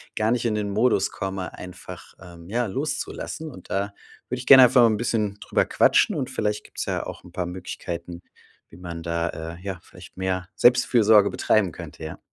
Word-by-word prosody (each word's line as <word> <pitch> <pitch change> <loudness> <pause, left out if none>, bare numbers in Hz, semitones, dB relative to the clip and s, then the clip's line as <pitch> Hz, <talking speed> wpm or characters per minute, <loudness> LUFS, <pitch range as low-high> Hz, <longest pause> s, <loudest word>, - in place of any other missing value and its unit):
gar 110 +1 +1
nicht 120 -1 0
in 110 - +1
den 105 -1 -2
Modus 110 +5 +2
komme, 95 -1 -5
einfach, 90 -1 -10
ähm, 85 -2 -13
ja, 120 +3 0
loszulassen. 155 +5 -4
Und 95 -8 -14
da 100 +1 -2 0.4
würde 125 0 -3
ich 125 - -8
gerne 130 -2 +10
einfach 125 +1 +5
mal - - +7
'n 110 - +2
bisschen 105 -3 -1
drüber - - +1
quatschen - - +3
und - - -2
vielleicht 105 -1 -2
gibt's - - -6
ja - - -2
auch - - -9
'n - - -15
paar 90 - -2
Möglichkeiten, 85 -1 -6 0.5
wie - - -15
man 85 -2 -7
da, 85 0 -1 0.3
äh, - - -16
ja, 95 -2 -6
vielleicht 90 -2 -15
mehr 95 -1 -2
Selbstfürsorge 110 -4 +5
betreiben 100 -7 +1
könnte, 80 - -9
ja. 80 - -7
100 Hz, 195 wpm, -24 LUFS, 90-115 Hz, 0.5 s, gerne